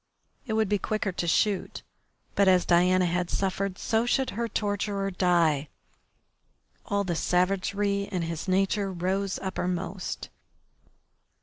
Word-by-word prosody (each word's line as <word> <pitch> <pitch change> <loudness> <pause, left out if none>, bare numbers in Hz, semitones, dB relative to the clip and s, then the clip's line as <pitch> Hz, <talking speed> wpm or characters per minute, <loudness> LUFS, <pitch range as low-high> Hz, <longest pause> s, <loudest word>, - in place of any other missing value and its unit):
It 220 - -2
would 220 -1 +2
be 205 +1 +1
quicker 215 0 -1
to 175 -1 -3
shoot, 200 +3 +1 0.5
but 200 - +3
as 185 -1 +5
Diana 180 +1 +4
had 175 0 -1
suffered 195 0 -1
so 225 +1 0
should 265 +1 +1
her 235 +2 -2
torturer 205 -2 -1
die. 170 -6 +2 1.2
All 200 0 +1
the 175 -3 -2
savagery 195 +3 +1
in 180 -3 -1
his 165 +2 -4
nature 195 +1 +1
rose 190 +2 -1
uppermost. 185 0 -3
190 Hz, 125 wpm, -27 LUFS, 180-200 Hz, 1.2 s, as